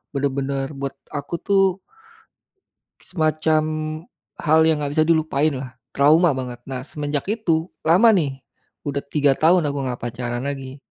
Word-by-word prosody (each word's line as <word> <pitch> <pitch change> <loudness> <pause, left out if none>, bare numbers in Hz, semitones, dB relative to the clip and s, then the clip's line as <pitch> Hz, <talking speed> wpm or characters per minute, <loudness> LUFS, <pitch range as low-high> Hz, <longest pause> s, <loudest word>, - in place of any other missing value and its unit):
bener-bener 140 0 -1
buat 140 0 -4 0.2
aku 145 +3 -4
tuh 195 -1 +2 1.2
Semacam, 155 -2 +1 0.7
hal 160 0 +3
yang 155 -2 +2
gak 140 - -3
bisa 155 0 +3
dilupainlah, 150 -5 0 0.2
trauma 155 +4 +5
banget 125 -2 -5
nah 130 0 -4
semenjak 145 -2 -3
itu 165 -7 0 0.2
lama 200 +8 +6
nih, 140 -7 -1 0.4
udah 140 0 -2
3 140 -1 +2
tahun 165 +3 +3
aku 140 0 -3
gak 125 - -5
pacaran 120 +1 -4
lag,i 135 -1 -5
145 Hz, 130 wpm, -22 LUFS, 135-160 Hz, 1.2 s, lama